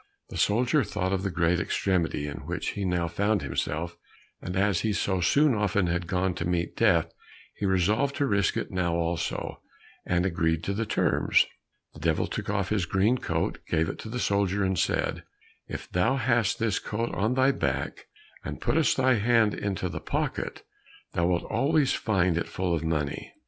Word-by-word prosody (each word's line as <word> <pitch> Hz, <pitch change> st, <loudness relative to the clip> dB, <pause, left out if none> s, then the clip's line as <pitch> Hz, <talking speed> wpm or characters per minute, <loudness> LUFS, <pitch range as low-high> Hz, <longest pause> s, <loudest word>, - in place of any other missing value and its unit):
The -, -, -5 dB
soldier 125 Hz, +7 st, +3 dB
thought 95 Hz, -2 st, -2 dB
of 95 Hz, -, 0 dB
the 100 Hz, -, -1 dB
great 85 Hz, 0 st, +1 dB
extremity 85 Hz, -5 st, 0 dB
in 75 Hz, 0 st, -5 dB
which -, -, -2 dB
he 100 Hz, -, -3 dB
now 90 Hz, -2 st, 0 dB
found 100 Hz, +3 st, 0 dB
himself, 80 Hz, +5 st, -2 dB, 0.5 s
and 90 Hz, -, -5 dB
as 100 Hz, -2 st, +2 dB
he 110 Hz, -1 st, 0 dB
so 95 Hz, -2 st, 0 dB, 0.3 s
often 100 Hz, -2 st, +1 dB
had 85 Hz, 0 st, -1 dB
gone 90 Hz, +1 st, 0 dB
to 85 Hz, -, -4 dB
meet 85 Hz, -1 st, -1 dB
death, -, -, +3 dB, 0.4 s
he 100 Hz, -, -2 dB
resolved 105 Hz, +10 st, +2 dB
to 145 Hz, -, +1 dB
risk 100 Hz, -6 st, +1 dB
it -, -, -3 dB
now 90 Hz, -2 st, 0 dB
also, 85 Hz, 0 st, -2 dB, 0.4 s
and 90 Hz, 0 st, +1 dB
agreed 80 Hz, -2 st, 0 dB
to 100 Hz, -, -1 dB
the 110 Hz, +2 st, -2 dB
terms. -, -, +3 dB, 0.5 s
The -, -, -12 dB
Devil 80 Hz, 0 st, +1 dB
took -, -, -5 dB
off 100 Hz, -2 st, 0 dB
his 100 Hz, -5 st, 0 dB
green 100 Hz, +8 st, +2 dB
coat, -, -, -1 dB
gave 80 Hz, 0 st, +1 dB
it -, -, -6 dB
to 110 Hz, -, -7 dB
the 125 Hz, -, -4 dB
soldier, 100 Hz, -3 st, +1 dB
and 95 Hz, -2 st, 0 dB
said, -, -, 0 dB, 0.5 s
"If -, -, -6 dB
thou 90 Hz, +9 st, +2 dB
hast 115 Hz, -5 st, +1 dB
this 115 Hz, -3 st, 0 dB
coat 115 Hz, +3 st, -3 dB
on 110 Hz, +7 st, 0 dB
thy 130 Hz, +1 st, +4 dB
back 70 Hz, -, -3 dB, 0.4 s
and -, -, -5 dB
puttest 160 Hz, -1 st, +2 dB
thy 130 Hz, -2 st, +4 dB
hand 110 Hz, -1 st, +3 dB
into 95 Hz, -2 st, -2 dB
the 85 Hz, -, -5 dB
pocket, -, -, -3 dB, 0.5 s
thou 85 Hz, 0 st, +1 dB
wilt 90 Hz, -1 st, +1 dB
always 145 Hz, -1 st, +2 dB
find 95 Hz, -5 st, +1 dB
it -, -, -3 dB
full 90 Hz, -2 st, -1 dB
of 80 Hz, -1 st, -1 dB
money." 75 Hz, -3 st, -2 dB
95 Hz, 185 wpm, -27 LUFS, 85-110 Hz, 0.5 s, thy